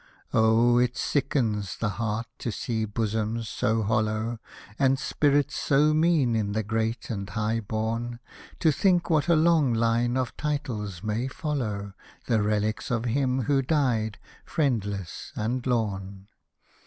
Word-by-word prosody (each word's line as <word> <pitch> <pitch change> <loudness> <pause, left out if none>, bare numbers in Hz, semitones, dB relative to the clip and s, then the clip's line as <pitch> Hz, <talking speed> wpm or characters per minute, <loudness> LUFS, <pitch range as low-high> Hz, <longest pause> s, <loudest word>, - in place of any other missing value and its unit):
Oh 115 +2 +4
I 125 - +5
it 125 +1 -6
sickens 115 -8 0
the 115 - -1
heart 115 +1 -1
to 120 - -3
see 110 +1 -2
bosoms 110 +1 -2
so 110 0 0
hollow. 110 +2 0 0.4
And 135 -1 +4
spirits 145 +1 +1
so 150 +2 +3
mean 155 -7 +3
in 105 -2 -1
the 110 +1 0
great 110 +2 -2
and 100 -2 -4
high 110 +2 -1
born; 115 +2 -3 0.4
To 160 - +5
think 175 +3 +2
what 155 -1 +2
a 170 - +5
long 155 -6 +4
line 115 +2 +1
of 130 -2 -2
titles 120 - -3
may 110 +4 -1
follow 115 -9 -3 0.3
The 115 -3 +2
relics 105 +1 0
of 120 -1 -1
him 130 +1 +1
who 135 +3 +2
died 125 -7 0 0.2
— - - -22
friendless 105 - -2
and 120 +4 -2
lorn 100 -5 -2
115 Hz, 145 wpm, -26 LUFS, 110-135 Hz, 0.4 s, I